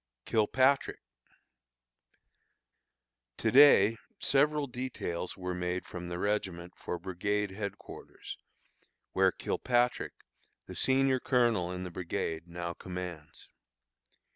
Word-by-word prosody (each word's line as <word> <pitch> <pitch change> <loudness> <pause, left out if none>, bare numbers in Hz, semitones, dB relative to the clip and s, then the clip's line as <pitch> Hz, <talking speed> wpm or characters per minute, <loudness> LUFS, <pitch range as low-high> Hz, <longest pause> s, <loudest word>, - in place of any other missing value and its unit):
KILPATRICK. 130 +5 +2 2.4
To 115 - 0
day 130 -4 +7 0.2
several 150 +1 +2
details 125 -9 -4
were 90 -1 -3
made 90 +1 -2
from 90 -1 -7
the 85 - -4
regiment 90 -3 -2
for 90 - -4
brigade 95 +3 -2
headquarters, 100 0 -8 0.7
where - - +4
Kilpatrick, 125 0 0 0.5
the - - -9
senior 135 0 +3
colonel 120 -9 +2
in 90 0 -4
the 90 - -6
brigade, 85 -1 -3
now 85 0 -4
commands. 90 -4 -7
95 Hz, 95 wpm, -31 LUFS, 90-125 Hz, 2.4 s, day